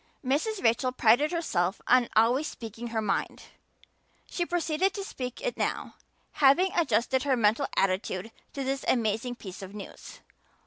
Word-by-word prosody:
Mrs. 350 - 0
Rachel 245 +3 +2
prided 250 +5 +3
herself 200 - -1
on 250 -1 +4
always 245 +7 +3
speaking 230 0 -7
her 225 -1 -2
mind; 200 -2 -2 0.8
she 345 -1 -3
proceeded 350 +2 0
to 400 - -4
speak 255 -9 -6
it - - -2
now, - - -2 0.4
having 300 +7 +4
adjusted 260 - +1
her 265 -1 +1
mental 230 +5 +2
attitude 190 +2 0 0.2
to 275 - -3
this 270 +1 -2
amazing 235 +1 0
piece 190 -6 -9
of 195 +1 -9
news. 205 - -10
250 Hz, 145 wpm, -28 LUFS, 220-295 Hz, 0.8 s, on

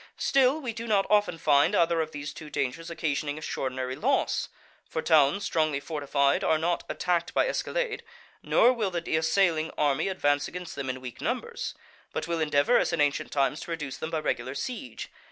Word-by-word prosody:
Still, 270 +2 +3
we 250 -6 -4
do 230 +1 -6
not 200 -3 +3
often 205 -5 +3
find 150 +5 +3
either 170 -2 +3
of 155 - -3
these 145 -1 -6
two 155 - -9
dangers 140 +4 -3
occasioning 150 -3 -2
extraordinary 130 -4 -3
loss. - - 0 0.4
For - - -3
towns 160 +5 +4
strongly 155 -4 +1
fortified 145 +2 0
are 160 - +3
not 170 +2 0
attacked 175 -1 -1
by - - +3
escalade, - - -2 0.4
nor 250 - +4
will 220 -5 -1
the 170 -3 -2
assailing 160 0 +2
army 145 +3 +2
advance 145 -6 +1
against 180 0 -7
them 140 -2 -4
in 130 0 -4
weak 125 -2 -8
numbers; - - -3 0.4
but - - -3
will 170 -1 -1
endeavour, 150 +9 +3
as - - 0
in 170 - -1
ancient 145 +1 +1
times, 145 +2 +1
to - - -8
reduce 150 -5 -4
them 160 - -4
by 165 - -1
regular 130 -3 -2
siege. 255 - -5
160 Hz, 185 wpm, -27 LUFS, 145-185 Hz, 0.4 s, towns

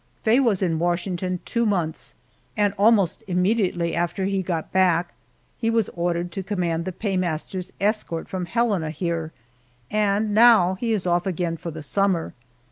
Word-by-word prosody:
Faye 225 +4 +4
was 220 -8 +2
in 165 -3 0
Washington 175 +1 -1
two 235 -1 0
months, 180 -8 -1 0.4
and 205 -1 +2
almost 200 -3 +3
immediately 180 -2 +1
after 175 +3 -1
he 195 0 0
got 170 -3 -3
back 180 -2 +2 0.5
he 225 - 0
was 225 -3 +1
ordered 175 0 -2
to 195 - -4
command 175 -4 -2
the 185 - -3
paymaster's 185 -2 -2
escort 200 -5 -1
from 185 -2 -4
Helena 205 -7 0
here, 165 0 -3 0.6
and 210 0 +1
now 220 -5 +6
he 225 +5 -2
is 210 -5 0
off 175 +1 +1
again 175 -2 -1
for 170 +1 -6
the 160 -1 -7
summer! 190 +1 0
185 Hz, 155 wpm, -23 LUFS, 170-205 Hz, 0.6 s, now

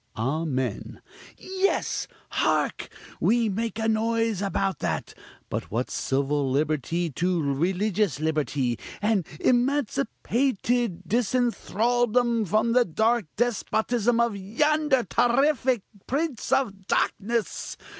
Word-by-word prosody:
(Amen) 130 -2 -2 0.4
Yes! 380 +1 -1 0.2
hark! - - 0 0.3
we 230 0 +3
make 220 +3 -2
a 220 0 0
noise 225 -2 +1
about 195 -1 -1
that! - - -2 0.3
But - - -4
what's 120 +4 -2
civil 140 +1 0
liberty 155 +4 0
to 175 +5 0
religious 180 +5 0
liberty, 145 -6 0 0.2
and 205 -5 +1
emancipated 245 -5 0
disenthraldom 240 0 +1
from 215 +5 +2
the 250 +1 +5
dark 220 +3 +1
despotism 235 0 +1
of 235 -3 +2
yonder 270 +7 +1
terrific 255 -2 +2 0.2
prince 280 -3 -2
of 205 -8 0
darkness! 230 +2 -1
220 Hz, 95 wpm, -26 LUFS, 175-245 Hz, 0.4 s, the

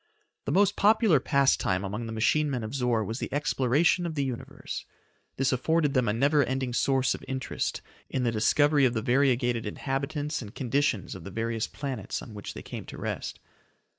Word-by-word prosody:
The - - -1
most 200 0 +3
popular 210 - +4
pastime 130 -9 +2
among 105 +4 -4
the - - -5
machine 145 +7 +2
men 125 -4 -2
of 110 +3 -5
Zor 125 -4 +1
was 110 +5 -4
the - - -4
exploration 145 +5 +2
of 160 - -5
the 140 - 0
Universe. 125 -3 -6 0.5
This 135 0 +2
afforded 150 +3 +1
them 130 -4 +2
a - - +3
never 140 +5 +3
ending 130 -2 -2
source 135 +1 +2
of - - -8
interest 130 -1 -3 0.3
in 130 - -1
the 120 - +2
discovery 145 +6 +3
of 120 -1 +1
the 110 - -1
variegated 125 -3 +2
inhabitants 145 +5 -2
and 105 -3 -10
conditions 130 - 0
of 95 - -9
the 95 - -7
various 115 +2 -2
planets 130 -8 -5
on 110 - -10
which 105 - -7
they - - -7
came - - -7
to - - -8
rest. - - -4
130 Hz, 190 wpm, -28 LUFS, 115-145 Hz, 0.5 s, popular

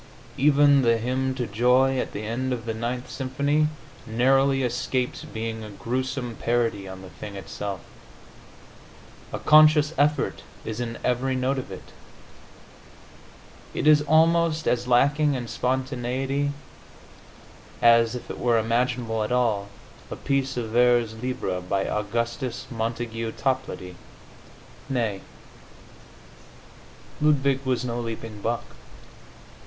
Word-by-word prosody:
Even 145 0 +5
the 115 -2 +3
hymn 130 +3 -1
to 125 -2 -2
joy 125 +5 +3
at - - -3
the 105 - -5
end 125 +4 -2
of 120 -2 -3
the 115 - -2
Ninth 120 +3 -3
symphony 140 +3 0 0.4
narrowly 135 +4 +3
escapes 125 +1 -1
being 110 0 -5
a 105 - -8
gruesome 125 +3 -3
parody 115 -4 0
on 95 0 -9
the 95 - -11
thing 105 -2 -9
itself; 95 0 -5 1.5
a - - -3
conscious 155 0 +6
effort 150 +1 +1 0.2
is 110 +1 -4
in 115 -1 -4
every 130 +2 0
note 130 +1 0
of 125 - -8
it; 95 - -10 1.8
it - - -2
is 150 -1 +7
almost 160 +1 +3
as 120 0 +1
lacking 145 +4 +3
in 120 -2 -4
spontaneity 130 +2 -1 1.3
as 115 0 +5
(if 125 - -7
it - - -8
were 120 -1 +3
imaginable 115 0 0
at 105 - -4
all) 115 -5 +1 0.4
a - - -5
piece 135 -2 -1
of 115 -3 -3
vers 120 -1 +3
libre 95 -8 -2
by 95 +2 -1
Augustus 115 +4 -2
Montague 115 -1 -3
Toplady. 130 -9 -3 0.9
Nay; 115 -7 -1 2.0
Ludwig 140 -3 +2
was 130 -1 0
no 120 -1 -2
leaping 115 -2 -6
buck. 115 +2 -2
125 Hz, 120 wpm, -25 LUFS, 115-135 Hz, 2.0 s, is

